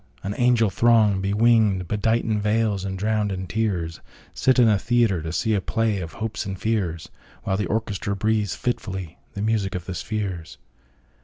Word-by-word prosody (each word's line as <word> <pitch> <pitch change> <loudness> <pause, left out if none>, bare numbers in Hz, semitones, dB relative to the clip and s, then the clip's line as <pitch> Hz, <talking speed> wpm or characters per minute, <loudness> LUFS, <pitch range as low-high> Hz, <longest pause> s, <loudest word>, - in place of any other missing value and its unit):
An 100 - -2
angel 120 -4 +3
throng, 110 -4 +4
bewinged, 105 -1 +3
bedightIn 110 +1 0
veils, 105 -2 +1
and 95 -1 -4
drowned 105 0 0
in 95 -1 -4
tears, 90 -4 -2 0.3
Sit 130 0 +2
in 120 -2 +6
a 105 -3 +3
theatre, 115 -6 +2
to 80 0 -5
seeA 110 +3 +1
play 110 +1 0
of 85 -3 -6
hopes 110 +1 -4
and 95 -1 -5
fears, 95 -8 -2 0.3
While 95 - 0
the 105 - -1
orchestra 105 -2 -2
breathes 105 -1 0
fitfullyThe 95 -4 -5
music 105 -3 0
of 90 -2 -4
the 95 - -5
spheres. 95 -2 -4
105 Hz, 160 wpm, -24 LUFS, 95-110 Hz, 0.3 s, in